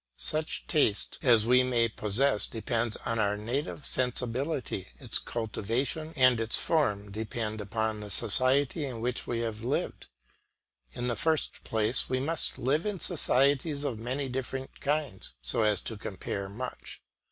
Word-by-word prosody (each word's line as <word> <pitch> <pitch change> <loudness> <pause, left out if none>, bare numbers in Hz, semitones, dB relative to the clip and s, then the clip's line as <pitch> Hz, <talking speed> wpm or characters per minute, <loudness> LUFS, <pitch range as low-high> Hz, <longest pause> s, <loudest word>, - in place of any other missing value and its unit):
Such 155 +1 -1
taste 110 -9 +1
as 115 -4 +5
we 125 +2 +6
may 120 -2 +2
possess 110 +1 +1
depends 115 -1 -1
on 115 -1 -1
our 105 -1 +1
native 130 +7 -3
sensibility; 125 - 0
its - - -1
cultivation 120 +7 -2
and 130 -3 +5
its 115 0 +2
form 105 -11 0
depend 110 0 -3
upon 110 +1 -2
the 105 0 -7
society 130 - +2
in 130 -5 -4
which 125 +2 -2
we 115 -1 -1
have 110 -1 -4
lived. 130 +5 -2 0.9
In 120 - -3
the 120 - 0
first 160 +6 0
place 110 +2 +2
we 130 - +1
must 150 +3 0
live 150 - 0
in 205 -3 -2
societies 145 -2 +3
of 130 -7 -2
many 130 +4 -2
different 130 +1 -5
kinds, 140 - -2
so 60 - -1
as 105 -3 +2
to 110 - -6
compare 100 -1 -4
much. 125 +5 -7
120 Hz, 150 wpm, -29 LUFS, 110-135 Hz, 0.9 s, we